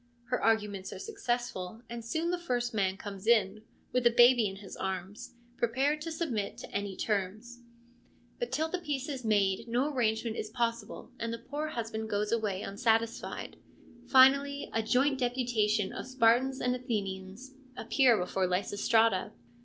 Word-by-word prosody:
Her 250 - -1
arguments 210 -4 +1
are - - -7
successful, 240 - -3
and 235 0 -7
soon 320 +9 -1
the 355 - -1
first 245 -7 -2
man 195 -3 0
comes 200 0 -8
in, 215 -3 +3 0.3
with 250 -1 +4
a - - +7
baby 240 -1 +6
in 195 - -6
his 195 0 -10
arms, 190 +6 -5 0.2
prepared 270 +6 +1
to 330 +1 -4
submit 260 -11 -2
to - - -9
any 200 -1 -3
terms. 215 +4 -3 0.8
But 485 - -3
till 315 +1 0
the 365 +3 -3
peace 290 -5 -3
is 270 -4 -5
made, 205 -1 +1
no 255 +6 0
arrangement 225 -2 0
is 215 - -4
possible 230 +1 -3
and 230 0 -2
the 230 - -3
poor 290 +6 -4
husband 225 -5 -4
goes 210 0 -1
away 210 -4 -1
unsatisfied. 225 +2 -1 0.5
Finally, 275 +2 +5
a 225 - +1
joint 265 +5 +2
deputation 235 -5 0
of - - -6
Spartans 260 +1 +3
and 250 0 +1
Athenians 210 0 -4 0.2
appear 240 0 +4
before 185 0 0
Lysistrata. 205 +2 +1
230 Hz, 155 wpm, -30 LUFS, 205-255 Hz, 0.8 s, a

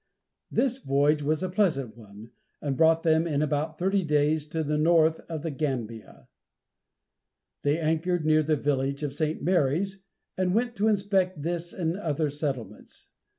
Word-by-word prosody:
This 265 -1 0
voyage 145 - +2
was 155 +3 0
a 185 - -1
pleasant 165 - 0
one, 110 0 -13 0.3
and 140 -2 -2
brought 160 +3 +4
them 160 0 +3
in 150 -2 0
about 155 +1 -2
thirty 195 +3 +1
days 150 0 +1
to 160 +1 -2
the 150 0 -1
mouth 160 0 +4
of 160 -2 -5
the 165 - -2
Gambia. 125 -7 -5 1.3
They 145 +2 +1
anchored 165 +1 0
near 155 0 +4
the 155 0 +1
village 140 0 -1
of 145 -2 -2
St. 155 +2 -2
Mary's, 180 +3 0 0.3
and 185 0 0
went 240 +1 0
to 210 +2 +2
inspect 195 -6 +1
this 170 +1 -3
and 170 -2 -2
other 155 -6 -1
settlements. 135 -8 -6
155 Hz, 155 wpm, -27 LUFS, 145-175 Hz, 1.3 s, brought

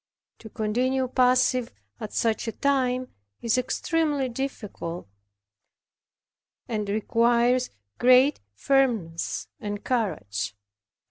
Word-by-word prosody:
To 220 - -11
continue 255 +5 0
passive 255 -1 +2 0.3
at 215 - -6
such 225 0 0
a - - 0
time 255 -1 0 0.3
is 230 0 +1
extremely 290 +1 0
difficult, 215 - -5 1.6
and 210 -3 -2
requires 235 +4 +2 0.3
great 255 +3 +5 0.2
firmness 225 - 0
and 205 0 -5
courage. 100 - -2
245 Hz, 85 wpm, -26 LUFS, 215-255 Hz, 1.6 s, great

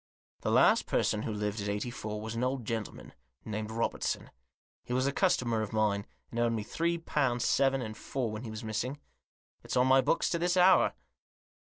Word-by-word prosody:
" - - -44
The - - -1
last - - +4
person 105 - +1
who 110 - -3
lived 105 0 -2
at 100 - -3
Eighty 105 +4 -2
four 105 -3 -5
was 110 +1 -5
an 115 +2 -2
old 130 -2 -1
gentleman, 110 -2 -5 0.3
named 110 0 -4
Robertson. 115 +1 -2 0.5
He 125 - -5
was 130 +1 +2
a 140 - +2
customer 125 - +1
of 110 0 -4
mine, 105 -2 +1 0.2
and 120 - -3
owed 120 -1 +2
me 110 -2 -2
three 170 +9 -1
pound 135 -7 0
seven 135 +1 +2
and 110 -1 -6
four 120 0 -3
when 110 +1 -5
he 120 - -7
was 110 0 -6
missing. 120 +6 -3 0.6
It's - - -3
on 125 - +5
my 130 0 +6
books 130 - +1
to 170 - 0
this 175 +2 +1
hour." 185 +1 +5
115 Hz, 205 wpm, -30 LUFS, 110-135 Hz, 0.6 s, my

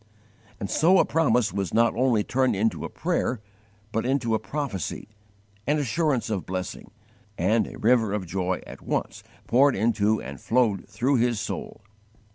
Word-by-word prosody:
And 100 - -3
so 170 - +4
a - - +5
promise 125 - +2
was 95 -4 -2
not 115 0 +4
only 120 -3 +2
turned 130 +1 +1
into 110 +3 0
a - - -5
prayer, 125 - -1 0.5
but 115 - -1
into 125 -3 0
a 110 - +2
prophecy 130 - -4 0.6
an 150 +2 +2
assurance 140 -3 0
of 100 -4 -3
blessing 95 0 -5 0.5
and 105 +5 +2
a - - -9
river 115 -2 +3
of 105 -2 -2
joy 90 +1 -2
at - - -11
once - - -3 0.2
poured 135 +3 +4
into 110 0 +2
and - - -8
flowed 115 -5 +1
through 120 +7 +1
his 120 -2 +1
soul. - - -5
115 Hz, 160 wpm, -25 LUFS, 100-130 Hz, 0.6 s, a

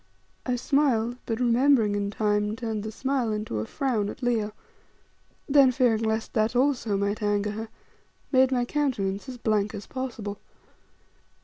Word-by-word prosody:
I 250 - +1
smiled, 245 -3 +1
but 225 0 -2
remembering 245 -2 +3
in 200 0 -1
time, 210 0 0
turned 225 -3 -3
the 215 +1 -5
smile 260 -1 -1
into 210 - -3
a 110 - -4
frown 230 -7 -1
at 260 - -9
Leo, 225 -3 +1 1.0
then 275 -2 +6
fearing 240 -3 +2
lest 220 0 -1
that 220 +2 +1
also 245 -5 +1
might 200 +2 -1
anger 205 0 0
her, 220 +1 -6 0.6
made 260 -1 +4
my 245 -2 +1
countenance 240 -7 -1
as 250 - -7
blank 215 -2 0
as 205 - -7
possible. 230 -6 -5
225 Hz, 150 wpm, -26 LUFS, 210-255 Hz, 1.0 s, then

